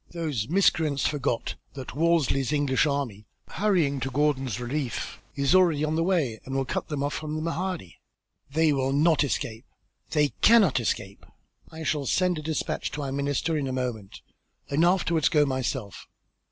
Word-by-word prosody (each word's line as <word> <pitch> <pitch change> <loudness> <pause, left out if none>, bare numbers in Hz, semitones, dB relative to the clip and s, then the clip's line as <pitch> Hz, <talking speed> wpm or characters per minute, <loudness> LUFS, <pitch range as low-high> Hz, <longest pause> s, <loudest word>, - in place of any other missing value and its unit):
"Those 150 -11 -3
miscreants 160 -5 +2
forgot 140 -5 -1 0.2
that 130 -2 -7
Wolseley's 150 -4 +2
English 145 -1 +2
army, 125 -8 -3 0.2
hurrying 175 -10 +1
to 135 - -2
Gordon's 135 -5 0
relief, 125 +1 -4
is 140 -1 +2
already 170 -5 +4
on 155 0 0
the 165 - +1
way 165 - 0
and 135 - -6
will 135 0 0
cut - - -3
them 150 -3 -3
off 145 +1 -1
from 155 0 -4
the 155 - -2
Mahdi. 165 - -4 0.5
They 155 +1 +3
will 135 -1 0
not 155 +2 +4
escape. 115 -3 -3 0.4
They 150 -2 +2
cannot 205 - +6
escape. 100 -4 -3 0.5
I 160 0 -7
shall 150 -3 -1
send 180 +1 +1
a - - -6
despatch 155 0 -2
to 145 - -4
our 135 - -3
minister 140 +4 -1
in 145 -3 -1
a - - -2
moment, 120 -6 -4 0.5
and 150 +4 +3
afterwards 170 -3 +3
go 150 -2 +4
myself. 130 -5 -3
145 Hz, 165 wpm, -26 LUFS, 130-160 Hz, 0.5 s, cannot